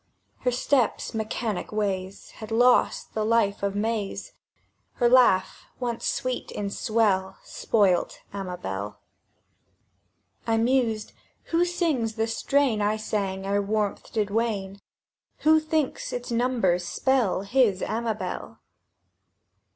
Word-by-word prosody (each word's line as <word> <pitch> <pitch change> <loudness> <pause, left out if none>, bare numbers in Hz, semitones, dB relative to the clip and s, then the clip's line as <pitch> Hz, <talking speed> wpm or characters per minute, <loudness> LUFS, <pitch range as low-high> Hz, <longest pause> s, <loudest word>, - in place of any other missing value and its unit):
Her 250 - +1
step's 250 0 +1
mechanic 220 -2 -3
ways 195 -3 -3
Had 215 - -10
lost 245 +2 +3
the 215 - -1
life 215 -2 +2
of 200 0 -1
May's; 210 -1 -2 0.6
Her 240 - +2
laugh, 240 -7 +4
once 240 -2 -2
sweet 255 -1 -2
in 200 -1 -4
swell, 200 -4 +1
Spoilt 195 -6 +1 0.2
Amabel. 105 - -5 1.5
I 225 0 +2
mused: 230 -2 +1 0.4
"Who 340 +1 +4
sings 310 -11 0
the 220 -1 +1
strain 235 0 +1
I 210 +1 +1
sang 195 -3 -2
ere 200 +1 +1
warmth 205 0 -2
did 210 -2 -1
wane? 200 -3 -1 0.6
Who 315 +1 +5
thinks 310 -2 -1
its 245 0 -5
numbers 230 -7 +1
spell 245 +1 +1
His 205 -3 +2
Amabel?" 225 -1 -3
220 Hz, 110 wpm, -26 LUFS, 200-245 Hz, 1.5 s, Who